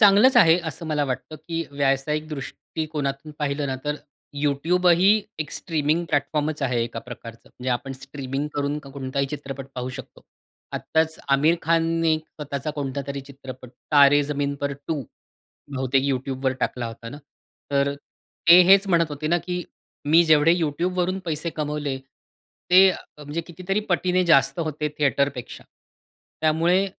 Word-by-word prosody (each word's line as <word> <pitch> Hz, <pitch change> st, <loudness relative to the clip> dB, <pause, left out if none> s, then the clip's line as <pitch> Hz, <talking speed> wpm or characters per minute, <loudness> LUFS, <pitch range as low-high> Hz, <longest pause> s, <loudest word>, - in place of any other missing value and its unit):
चांगलंच 210 Hz, +5 st, +6 dB
आहे 165 Hz, +1 st, +7 dB
असं 160 Hz, +2 st, -6 dB
मला 150 Hz, -2 st, 0 dB
वाटतं 135 Hz, +4 st, -4 dB
की 165 Hz, +2 st, -4 dB
व्यावसायिक 140 Hz, +2 st, 0 dB
दृष्टिकोनातून 150 Hz, 0 st, -5 dB
पाहिलं 145 Hz, 0 st, -1 dB
ना 130 Hz, -, -2 dB
तर 150 Hz, -, 0 dB, 0.5 s
YouTube 165 Hz, +6 st, +1 dB
ही 190 Hz, +3 st, +4 dB, 0.3 s
एक 155 Hz, -2 st, -4 dB
स्ट्रीमिंग 160 Hz, 0 st, 0 dB
प्लॅटफॉर्मच 150 Hz, +1 st, -1 dB
आहे 125 Hz, -3 st, +1 dB
एका 115 Hz, 0 st, -4 dB
प्रकारचं. 115 Hz, -1 st, -10 dB
म्हणजे 130 Hz, +1 st, -5 dB
आपण 125 Hz, +2 st, -2 dB
स्ट्रीमिंग 135 Hz, +1 st, -5 dB
करून 145 Hz, +1 st, -1 dB
कोणताही 140 Hz, -1 st, -3 dB
चित्रपट 135 Hz, -2 st, -6 dB
पाहू 125 Hz, 0 st, -4 dB
शकतो. -, -, -11 dB, 0.5 s
आत्ताच 160 Hz, 0 st, 0 dB
आमिर 150 Hz, +5 st, +4 dB
खानने 165 Hz, 0 st, +2 dB
स्वतःचा 150 Hz, -2 st, -6 dB
कोणता 140 Hz, -2 st, -3 dB
तरी 140 Hz, 0 st, -4 dB
चित्रपट 135 Hz, -2 st, -11 dB, 0.2 s
तारे 145 Hz, 0 st, +7 dB
जमीन 140 Hz, -1 st, -2 dB
पर 140 Hz, 0 st, -1 dB, 0.2 s
2 150 Hz, -4 st, -1 dB, 0.7 s
बहुतेक 130 Hz, 0 st, +1 dB
YouTubeवर 130 Hz, -1 st, -1 dB
टाकला 120 Hz, -2 st, -1 dB
होता 115 Hz, 0 st, -8 dB
ना. 145 Hz, +4 st, -9 dB, 0.5 s
तर 140 Hz, 0 st, +1 dB, 0.5 s
ते 175 Hz, +2 st, +10 dB
हेच 195 Hz, +1 st, +7 dB
म्हणत 170 Hz, -3 st, +3 dB
होते 145 Hz, +1 st, -4 dB
ना 175 Hz, -, +3 dB
की 180 Hz, 0 st, -2 dB, 0.4 s
मी 160 Hz, +4 st, +6 dB
जेवढे 160 Hz, +1 st, +5 dB
YouTubeवरून 180 Hz, +4 st, 0 dB
पैसे 160 Hz, 0 st, -2 dB
कमवले 150 Hz, -3 st, -2 dB
ते 180 Hz, +7 st, +1 dB, 0.3 s
म्हणजे 150 Hz, +3 st, -4 dB
कितीतरी 185 Hz, +4 st, -2 dB
पटीने 180 Hz, 0 st, +2 dB
जास्त 135 Hz, -2 st, +4 dB
होते 155 Hz, -1 st, -2 dB
थिएटरपेक्षा. 140 Hz, -3 st, -1 dB, 0.8 s
त्यामुळे 165 Hz, +5 st, +3 dB
145 Hz, 140 wpm, -24 LUFS, 135-165 Hz, 0.8 s, ते